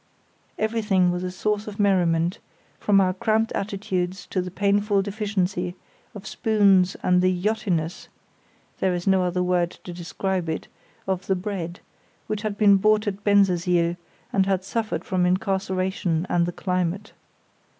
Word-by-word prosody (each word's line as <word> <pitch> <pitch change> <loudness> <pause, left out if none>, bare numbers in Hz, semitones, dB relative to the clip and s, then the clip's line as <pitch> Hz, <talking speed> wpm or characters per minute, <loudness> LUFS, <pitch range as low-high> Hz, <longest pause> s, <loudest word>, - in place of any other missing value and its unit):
Everything 210 -5 +2
was 180 0 -3
a 185 - -2
source 210 +3 -2
of 210 -1 -8
merriment, 175 -4 +2 0.4
from 200 -1 +4
our 185 -1 +3
cramped 220 +4 +1
attitudes 190 -2 -3
to 185 - -2
the 180 - -5
painful 200 +1 +1
deficiency 195 -3 -2 0.4
of 205 - -9
spoons 200 -4 +3
and 180 0 +3
the 185 0 +3
"yachtiness" 180 -3 -1 0.7
(there 185 -1 +1
is 175 - -4
no 190 -1 +4
other 180 0 0
word 180 -1 +1
to 175 - -7
describe 180 0 -3
it) 160 - -3 0.4
of 190 -1 -2
the 190 - +2
bread, 180 -2 -5 0.4
which 215 -1 -3
had 210 -2 -3
been 200 -2 +6
bought 215 +2 +3
at 205 0 -4
Bensersiel, 180 -4 +3 0.4
and 195 -1 +2
had 190 -1 +1
suffered 220 +3 -2
from 185 -2 0
incarceration 185 -2 0
and 170 -1 +1
the - - -2
climate. 180 +2 -2
190 Hz, 150 wpm, -24 LUFS, 180-205 Hz, 0.7 s, been